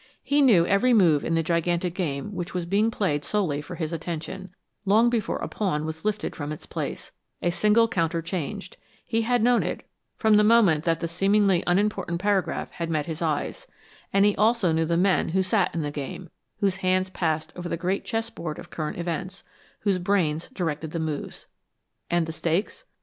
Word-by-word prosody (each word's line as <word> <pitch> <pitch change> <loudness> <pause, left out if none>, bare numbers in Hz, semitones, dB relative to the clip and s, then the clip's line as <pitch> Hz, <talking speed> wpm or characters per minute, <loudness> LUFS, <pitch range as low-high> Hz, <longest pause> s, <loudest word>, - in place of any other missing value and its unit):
He 290 +1 +2
knew 210 -11 +6
every 235 +7 +3
move 165 -8 +4
in 165 - 0
the 165 - +1
gigantic 170 +1 0
game 165 -1 -3
which 180 0 -5
was 180 -2 -1
being 205 +5 +2
played 155 -10 -1
solely 170 -8 -1
for 175 - -8
his 165 -1 -3
attention, 165 +3 -5 0.3
long 220 +4 +4
before 230 -4 -1
a - - -4
pawn 155 -8 -1
was 160 0 -6
lifted 215 0 -2
from 145 -1 -5
its 155 - -7
place, - - -5 0.3
a 175 - 0
single 215 +5 +4
counter 170 -6 0
changed; 185 +4 -5 0.3
he 225 -1 0
had 240 0 +1
known 245 0 +4
it, - - -4 0.3
from 220 -2 +4
the 210 - +5
moment 210 -9 +4
that 165 -1 +1
the 170 - -1
seemingly 195 +1 +2
unimportant 180 -2 +1
paragraph 200 -1 0
had 170 -1 -4
met 155 -3 0
his 160 0 -5
eyes; 165 - -2 0.4
and 195 +1 +4
he 205 - +3
also 215 -4 +3
knew 160 0 +1
the 170 +1 +1
men 190 +1 +2
who 190 +3 +1
sat 190 0 +1
in 165 - -1
the 145 - -3
game, 145 +5 -6 0.3
whose 195 -2 +2
hands 185 0 +1
passed 160 -4 -1
over 175 -1 -5
the - - -2
great 185 +4 -1
chessboard 225 -9 -4
of - - -11
current 155 -2 -4
events, 175 +3 -4 0.4
whose 195 -3 +1
brains 175 -4 0
directed 160 - -3
the 165 - -4
moves. 155 -3 -4 0.6
And 175 -1 +2
the 160 - -5
stakes? 170 +5 -2
180 Hz, 195 wpm, -25 LUFS, 165-205 Hz, 0.6 s, knew